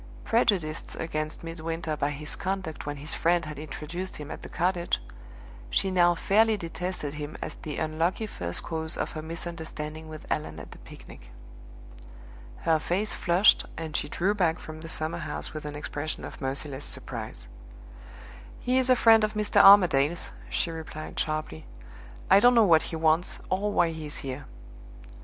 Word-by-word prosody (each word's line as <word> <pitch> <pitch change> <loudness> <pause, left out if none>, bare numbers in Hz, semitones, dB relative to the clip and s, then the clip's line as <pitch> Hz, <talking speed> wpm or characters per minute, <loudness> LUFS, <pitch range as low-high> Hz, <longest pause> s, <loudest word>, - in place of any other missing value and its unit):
Prejudiced 190 -9 +1
against 155 -1 -4
Midwinter 165 -1 -3
by 145 -1 0
his 150 +1 -5
conduct 185 -6 -4
when 145 0 -3
his 150 +3 -3
friend 170 0 +2
had 150 -2 -7
introduced 155 +5 -6
him 150 0 -7
at - - -7
the - - -9
cottage, 175 0 0 0.7
she 190 - +1
now 175 -1 +4
fairly 215 +5 +3
detested 175 -4 -4
him 150 0 -6
as - - -5
the 150 -2 -5
unlucky 165 +7 0
first 90 - -3
cause 160 0 -3
of - - -2
her 155 - -5
misunderstanding 160 -1 -6
with 155 -1 -9
Allan 80 - -2
at 75 - -10
the - - -12
picnic. - - -13 1.3
Her 160 -1 +3
face 190 +7 0
flushed 180 +3 +4
and 160 -1 -5
she - - -1
drew 190 +4 +1
back 175 -5 +2
from 155 0 -9
the 165 - -7
summerhouse 165 +2 -2
with 155 -1 -6
an 145 0 -5
expression 150 +1 -4
of - - -9
merciless 135 +1 -3
surprise. - - -4 1.1
"He 255 +1 +2
is 260 0 0
a 255 - +7
friend 225 -2 +6
of 215 0 0
Mr. 210 -1 +4
Armadale's," 175 -6 +6 0.2
she 170 - -1
replied 160 -1 -6
sharply. 155 - -3 0.6
"I 195 - +7
don't 245 +3 +6
know 230 - +7
what 165 -5 +6
he - - -4
wants, 160 +2 +2
or 200 +3 +1
why 170 -4 +3
he 160 -2 -6
is 145 - -3
here." 135 0 -6
160 Hz, 165 wpm, -28 LUFS, 150-185 Hz, 1.3 s, a